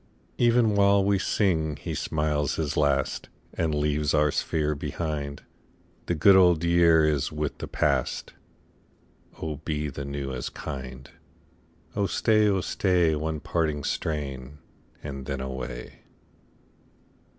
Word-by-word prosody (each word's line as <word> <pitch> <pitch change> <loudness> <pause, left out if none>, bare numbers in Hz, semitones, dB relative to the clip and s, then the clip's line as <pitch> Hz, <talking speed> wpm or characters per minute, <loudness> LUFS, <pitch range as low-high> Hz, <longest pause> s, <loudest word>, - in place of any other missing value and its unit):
37 120 - +4
Even 115 -3 +3
while 100 -1 +4
we 100 -1 +2
sing 80 -8 +1
he - - -6
smiles 75 -2 -1
his 75 -3 -2
last 70 -2 0 0.2
And 80 -2 -1
leaves 75 0 +1
our 75 -1 +3
sphere 75 0 0
behind. 70 -1 -4 0.6
The 90 - 0
good 95 +5 +6
old 90 -3 +5
year 85 -2 +5
is 75 -3 0
with 75 -1 -3
the - - -5
past; - - -1 1.1
Oh 75 -2 -4
be 75 0 -3
the 70 +1 -6
new 70 -1 -4
as 65 - -4
kind! 65 -3 -7 0.9
Oh 100 -1 +1
staj, 110 0 +3
oh 95 -2 +2
stay, 90 -4 +2
One 75 0 -3
parting 75 -4 -1
strain, 70 -3 -3 0.5
and 70 -2 -6
then 70 -2 -3
away. 65 -2 -6
75 Hz, 130 wpm, -26 LUFS, 70-85 Hz, 1.1 s, good